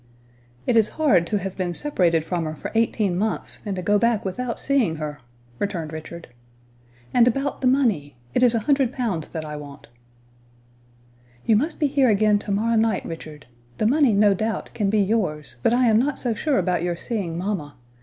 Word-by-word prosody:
"It 245 - +1
is 220 -2 +4
hard 205 - +3
to 210 - 0
have 195 -1 -5
been 180 -2 -2
separated 175 - +1
from 170 -1 -2
her 155 0 -4
for - - -7
eighteen 220 -4 +1
months, 215 +4 -2
and 200 - -2
to 185 - -4
go 205 +2 +3
back 230 -2 +1
without 235 +6 -3
seeing 260 -12 +1
her," 150 -1 -5 0.4
returned 170 -6 -3
Richard. 165 +2 -8 0.8
"And 245 -1 +5
about 275 +4 -1
the 260 - +2
money? 210 - +1 0.2
It - - +1
is 245 -2 +5
a 225 - +1
hundred 270 +1 +2
pounds 210 - -2
that 160 -1 -6
I 150 0 -6
want." 145 -3 -11 1.6
"You 225 - +4
must 300 +9 0
be 305 - +2
here 275 -2 +3
again 210 0 +3
to 205 - -5
morrow 225 +3 +1
night, 220 0 +1
Richard; 155 -3 -8 0.3
the - - 0
money, 275 +2 +4
no 205 0 +5
doubt, 220 +3 -3
can 205 -3 0
be 215 +1 +2
yours, 185 - -1
but - - +3
I 250 +1 +3
am 220 -1 +5
not 275 +3 0
so 240 -3 0
sure 280 +6 0
about 180 -2 +1
your 175 0 -1
seeing 175 -3 -3
mamma. 175 -6 -3
205 Hz, 195 wpm, -23 LUFS, 170-235 Hz, 1.6 s, And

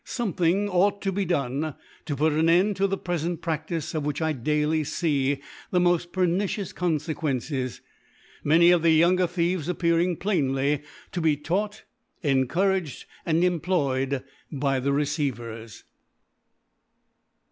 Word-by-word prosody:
Sonfiethiog 195 -3 0
ought 200 +3 +2
to 195 -1 0
Jbe 195 -1 -1
done^ 140 -1 -1 0.3
to 150 -3 -2
put 155 +3 +2
an 160 +2 +2
End 190 +5 +4
to 195 +1 +2
the 195 0 -1
(prefent 175 -2 -3
Practice, 165 -1 -3
of 155 -2 -2
which 145 0 -2
i 160 -1 +1
iee 125 -5 -10
daily 150 +2 +1
the 145 +2 -1
n[K)ft 175 -1 +2
pernicious 185 +2 0
Confequences>i 150 -6 -2 0.6
many 170 +4 +6
of 175 -2 +4
the 165 - +4
younger 175 +3 +4
Thieves 170 -2 -1
aj^aring 170 0 +1
pkrihly 145 -6 0 0.3
CO 175 - -3
be 155 -2 +2
taught, 205 +8 -2 0.4
encouraged 155 +5 +1 0.2
and 165 +1 +2
em* 180 -2 +2
ployed 140 -6 0 0.3
by 135 -2 0
the 140 +2 0
Receivers. 125 - -3
160 Hz, 135 wpm, -26 LUFS, 145-180 Hz, 0.6 s, many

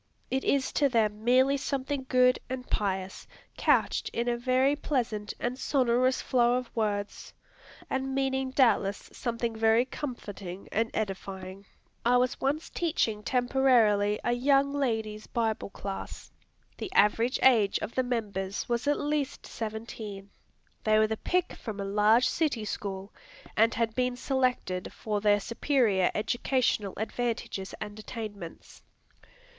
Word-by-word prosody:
It 265 +1 0
is 275 -2 +1
to 285 -2 +3
them 215 -3 +1
merely 260 +3 +4
something 270 -1 -3
good 250 0 +4
and 255 0 -5
pious, 190 -2 -2 0.3
couched - - +2
in 235 +1 -2
a 240 - +2
very 255 +3 +2
pleasant 230 -8 -2
and 245 +2 -2
sonorous 255 -1 +2
flow 245 -1 +3
of 250 -1 -4
words, 205 -2 -2 0.5
and 265 0 -2
meaning 265 -1 0
doubtless 230 -7 +2
something 235 -2 -3
very 225 +2 +4
comforting 205 -9 -7
and 225 +2 +1
edifying. 195 -1 -5 0.4
I 245 +1 +4
was 250 0 0
once 290 +4 -1
teaching 270 -11 0
temporarily 240 -5 +3
a - - +1
young 275 +3 +3
ladies' 220 -6 -2
Bible 225 -3 -1
Class. 195 0 -7 0.5
The 375 - -5
average 225 +4 +3
age 225 -6 +5
of - - -5
the 260 - +2
members 205 -6 -3
was 240 +3 -1
at 290 - +2
least 295 -2 -2
seventeen. 215 -3 -6 0.5
They 215 0 +4
were 215 - +5
the 220 0 -2
pick 360 +7 0
from 215 -4 -7
a 200 - -2
large 210 +4 +4
city 280 -9 0
school, 195 -1 -5 0.4
and 225 +1 +4
had 225 -1 0
been 250 0 0
selected 250 -9 -1
for 210 -2 -3
their 205 0 +4
superior 230 -4 +1
educational 230 -2 0
advantages 220 -3 -3
and 210 0 -7
attainments. 205 -6 -8
235 Hz, 135 wpm, -29 LUFS, 210-260 Hz, 0.5 s, age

